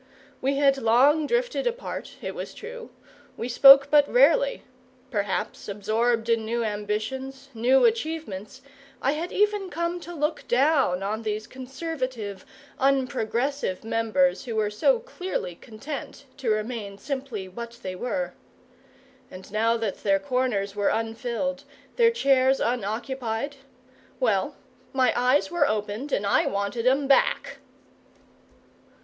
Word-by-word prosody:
We 275 Hz, +2 st, +1 dB
had 275 Hz, -1 st, +3 dB
long 270 Hz, +6 st, +4 dB
drifted -, -, 0 dB
apart, 485 Hz, +1 st, -5 dB
it -, -, -4 dB
was -, -, -7 dB
true, 480 Hz, 0 st, -9 dB, 0.5 s
we 230 Hz, -, -3 dB
spoke 275 Hz, +3 st, +8 dB
but 295 Hz, -1 st, +5 dB
rarely; -, -, +4 dB, 0.5 s
perhaps, 205 Hz, 0 st, -2 dB
absorbed 225 Hz, +3 st, 0 dB
in 230 Hz, -1 st, +2 dB
new 235 Hz, +2 st, -1 dB
ambitions, 220 Hz, +6 st, -4 dB
new 245 Hz, +4 st, +4 dB
achievements, 315 Hz, -, -2 dB, 0.4 s
I 265 Hz, -, +1 dB
had 320 Hz, +4 st, -3 dB
even 415 Hz, -2 st, +1 dB
come 340 Hz, +1 st, -2 dB
to 345 Hz, 0 st, -9 dB
look 300 Hz, +1 st, -2 dB
down 260 Hz, -, +2 dB
on 215 Hz, +3 st, -2 dB
these 215 Hz, -1 st, -3 dB
conservative, 255 Hz, -, -5 dB, 0.3 s
unprogressive 265 Hz, -4 st, 0 dB
members 230 Hz, +6 st, +1 dB
who 230 Hz, -3 st, -4 dB
were 210 Hz, -1 st, 0 dB
so 355 Hz, -, +3 dB
clearly 380 Hz, -, -5 dB
content 275 Hz, -, -8 dB
to 265 Hz, -4 st, -2 dB
remain 215 Hz, -2 st, -2 dB
simply 260 Hz, -4 st, -5 dB
what 235 Hz, +5 st, -8 dB
they 185 Hz, -, -4 dB
were. 250 Hz, +8 st, -3 dB, 1.0 s
And 185 Hz, +2 st, -11 dB
now 225 Hz, +2 st, +2 dB
that 225 Hz, -3 st, -3 dB
their 195 Hz, -1 st, +3 dB
corners 245 Hz, -6 st, -1 dB
were 205 Hz, -1 st, +1 dB
unfilled, 235 Hz, +5 st, -2 dB, 0.3 s
their 465 Hz, -1 st, +6 dB
chairs 270 Hz, -, +3 dB
unoccupied 240 Hz, +3 st, -2 dB, 0.6 s
well, -, -, +1 dB, 0.4 s
my 255 Hz, -3 st, +3 dB
eyes 255 Hz, +5 st, +2 dB
were 345 Hz, -, +2 dB
opened 215 Hz, +6 st, -3 dB
and 200 Hz, -, 0 dB
I 200 Hz, -, +3 dB
wanted 200 Hz, +4 st, -1 dB
'em 270 Hz, +2 st, +3 dB
back! 275 Hz, -, +2 dB
255 Hz, 130 wpm, -25 LUFS, 215-285 Hz, 1.0 s, spoke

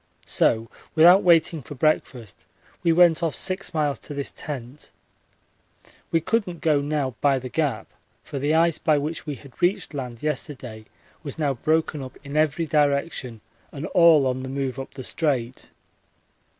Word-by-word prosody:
So 115 Hz, 0 st, +1 dB, 0.3 s
without 175 Hz, +5 st, +7 dB
waiting 165 Hz, -2 st, +3 dB
for 140 Hz, +4 st, -10 dB
breakfast 130 Hz, -, -1 dB, 0.3 s
we 170 Hz, -, +3 dB
went 170 Hz, -1 st, +5 dB
off 165 Hz, -3 st, -1 dB
six 190 Hz, 0 st, -1 dB
miles 150 Hz, -4 st, -1 dB
to 145 Hz, -, -9 dB
this 140 Hz, -1 st, -3 dB
tent. 135 Hz, -1 st, -8 dB, 1.2 s
We 165 Hz, -, +2 dB
couldn't 180 Hz, -1 st, -1 dB
go 150 Hz, -3 st, +2 dB
now 145 Hz, -3 st, -1 dB
by 140 Hz, -2 st, +3 dB
the 130 Hz, 0 st, -6 dB
Gap, 135 Hz, -7 st, -1 dB, 0.4 s
for 140 Hz, -, -6 dB
the 145 Hz, +3 st, +1 dB
ice 165 Hz, 0 st, +3 dB
by 155 Hz, -2 st, +2 dB
which 155 Hz, +3 st, -4 dB
we 145 Hz, -, -3 dB
had 130 Hz, +2 st, -16 dB
reached 175 Hz, -2 st, +1 dB
land 125 Hz, -4 st, -6 dB
yesterday 130 Hz, -7 st, -4 dB, 0.4 s
was 140 Hz, -5 st, -7 dB
now 145 Hz, -3 st, 0 dB
broken 155 Hz, +3 st, 0 dB
up 130 Hz, -1 st, -9 dB
in 140 Hz, +1 st, -8 dB
every 155 Hz, +2 st, +1 dB
direction 140 Hz, -6 st, 0 dB, 0.3 s
and 145 Hz, +2 st, -6 dB
all 165 Hz, -5 st, +6 dB
on 130 Hz, 0 st, -1 dB
the 130 Hz, -, -6 dB
move 135 Hz, -1 st, -3 dB
up 135 Hz, -, -8 dB
the 130 Hz, -, -7 dB
Strait. 130 Hz, -5 st, -2 dB
145 Hz, 165 wpm, -24 LUFS, 130-160 Hz, 1.2 s, without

